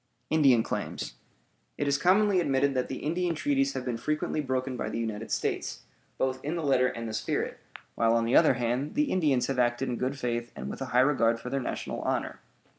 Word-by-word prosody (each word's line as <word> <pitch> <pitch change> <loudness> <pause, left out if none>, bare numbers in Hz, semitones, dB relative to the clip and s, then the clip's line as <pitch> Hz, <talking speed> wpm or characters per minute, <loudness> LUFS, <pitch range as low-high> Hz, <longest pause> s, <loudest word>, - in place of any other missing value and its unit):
INDIAN 135 -7 +5
CLAIMS - - -4 0.6
It 145 - -1
is 140 0 +2
commonly 195 +3 +4
admitted 140 -3 +2
that 130 -1 0
the 130 - -6
Indian 170 +2 0
treaties 275 - +1
have 125 - -4
been 120 -2 -2
frequently 150 +4 -1
broken 130 -1 -2
by - - -3
the - - -4
United 110 -1 -3
States, - - -2 0.3
both 130 0 -1
in 150 +4 -2
the 165 - -3
letter 130 -3 +3
and 115 -2 -4
the 110 - -5
spirit, 110 0 -2 0.3
while, 115 0 +2
on 115 0 +2
the 115 - +1
other 155 -5 +6
hand, 125 +4 -1
the 295 -1 +1
Indians 145 -9 +2
have 135 -1 -2
acted 120 +2 +1
in 120 - -2
good 130 +2 -2
faith 120 -2 -2
and 65 +2 -5
with - - -8
a - - -1
high 125 0 +2
regard 115 -4 +3
for 125 - -7
their 135 - 0
national - - -4
honor. - - -2
130 Hz, 215 wpm, -28 LUFS, 120-150 Hz, 0.6 s, other